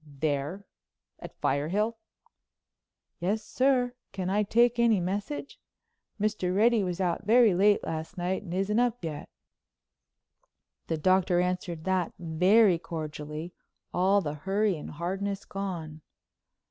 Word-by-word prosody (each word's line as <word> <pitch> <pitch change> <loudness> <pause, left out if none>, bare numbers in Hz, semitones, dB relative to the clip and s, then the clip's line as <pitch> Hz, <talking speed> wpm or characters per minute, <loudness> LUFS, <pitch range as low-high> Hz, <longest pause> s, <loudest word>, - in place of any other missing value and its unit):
"There, 150 +5 -3 0.5
at - - -11
Firehill?" 180 +11 +1 1.3
"Yes, 205 +5 -1
sir. 255 -2 +2 0.2
Can 185 -1 -3
I 205 +2 +2
take 235 +3 +3
any 230 -4 +4
message? 200 +11 -4 0.6
Mr. 200 -4 0
Reddy 225 +1 +4
was 180 -1 -3
out 175 -3 0
very 230 -2 +6
late 205 +3 +3
last 160 +4 -5
night 180 +2 -1
and 190 -5 -9
isn't 195 +4 +1
up 245 -3 0
yet." 150 -2 -6 1.6
The 160 - -1
Doctor 185 +2 +3
answered 180 -2 -2
that 185 -2 0
very 180 +3 +4
cordially, 155 0 -6 0.4
all 195 +3 +3
the 150 -5 -3
hurry 195 +6 0
and 150 - -8
hardness 195 +5 -3
gone. 170 -6 -5
185 Hz, 120 wpm, -28 LUFS, 165-210 Hz, 1.6 s, very